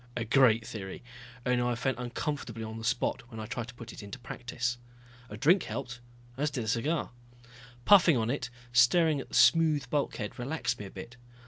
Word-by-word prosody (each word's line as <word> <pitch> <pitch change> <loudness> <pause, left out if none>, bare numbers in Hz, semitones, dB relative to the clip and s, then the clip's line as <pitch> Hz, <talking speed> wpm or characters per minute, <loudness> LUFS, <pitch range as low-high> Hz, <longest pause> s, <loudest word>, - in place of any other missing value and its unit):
A 115 - -2
great 115 -2 +4
theory, 105 -5 -7 0.4
only 125 -1 +2
I 120 0 0
felt 125 +2 -1
uncomfortably 125 -2 -4
on 110 0 -6
the - - -8
spot 125 +2 0
when 115 -3 -8
I 110 - -4
tried 115 +2 -4
to 120 - -11
put 115 -1 -9
it - - -9
into 100 +5 -8
practice. 120 -1 -4 0.5
A 105 - -7
drink 165 - +4
helped, 125 -2 -5 0.4
as 150 +2 +1
did 135 -5 -3
a - - -6
cigar. 140 +8 0 0.7
Puffing 175 -8 +7
on 115 +1 0
it, 130 -3 -3 0.2
staring 150 +5 +5
at - - -11
the - - -6
smooth 155 -5 +5
bulkhead, 140 -8 -2
relaxed 140 +6 -2
me 105 - -6
a - - -8
bit. 115 +6 -10
125 Hz, 195 wpm, -30 LUFS, 115-140 Hz, 0.7 s, Puffing